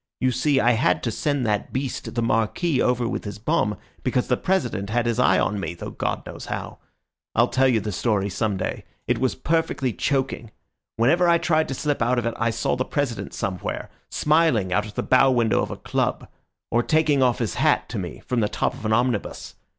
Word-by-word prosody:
You 130 0 +2
see, 140 +2 +2
I 120 -1 +4
had 115 +2 +2
to 115 - 0
send 145 +2 -1
that 105 -2 -1
beast, 130 -2 -4
the 120 - 0
Marquis, 115 +7 +1
over 125 -1 +1
with - - -3
his 100 -1 -6
bomb, 105 -3 0 0.2
because 125 -1 0
the 125 - +4
President 150 - -1
had 120 +2 +1
his 120 0 0
eye 95 -7 +4
on 105 +2 0
me, 85 -3 -4
though - - -7
God - - -3
knows - - -8
how. - - -5 0.6
I'll - - +4
tell 135 0 +3
you 120 -4 +3
the 105 +1 -4
story 100 0 0
some 100 0 -1
day. 95 - -3 0.2
It - - 0
was 130 0 0
perfectly 160 -6 0
choking. 135 -4 -1 0.5
Whenever 170 +10 +3
I 170 - +5
tried 160 -2 +1
to 135 - -3
slip 145 0 -1
out 125 +2 +2
of 120 - 0
it 115 - 0
I 115 +1 +1
saw 115 +1 0
the 130 - 0
President 120 -9 -3
somewhere, 95 -1 -4 0.2
smiling 150 - +2
out 105 +2 +1
of 105 - -12
the - - -1
bow 130 +1 +5
window 120 -3 +2
of - - -2
a - - -6
club, - - -1 0.4
or 120 - +3
taking 155 0 +2
off 125 -2 +3
his 115 -3 -2
hat - - +2
to - - -3
me - - -7
from 125 - 0
the 105 -2 +1
top - - -1
of 110 - -5
an 110 - +2
omnibus. 120 -2 -1
120 Hz, 220 wpm, -24 LUFS, 110-135 Hz, 0.6 s, I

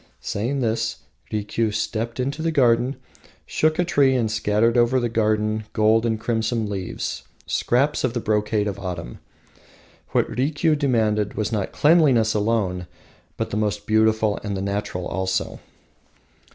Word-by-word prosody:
Saying 125 +7 -2
this, 115 -2 0 0.4
Rikiu 110 +1 -1
stepped 115 +3 -3
into 140 +5 -2
the 165 0 0
garden, 125 -2 +3 0.5
shook 155 0 +1
a 180 - +2
tree 140 -6 +3
and 115 -4 0
scattered 110 +2 +1
over 120 +2 +3
the 120 -1 -1
garden 110 -1 0
gold 110 +2 +3
and 110 -1 -1
crimson 110 -1 -1
leaves, 95 -3 -4 0.2
scraps 135 +5 +1
of 130 -3 0
the - - +1
brocade 105 -1 0
of 100 -1 -4
autumn! 85 -10 -6 0.9
What - - +1
Rikiu 150 +4 +1
demanded 110 -7 +1
was 110 0 -2
not 105 -4 -2
cleanliness 145 -9 +4
alone, 105 -5 0 0.5
but - - -3
the 105 0 -1
beautiful 110 -1 +2
and 100 -1 -3
the - - -3
natural 100 -2 -3
also. 95 +1 -2
110 Hz, 140 wpm, -23 LUFS, 105-125 Hz, 0.9 s, cleanliness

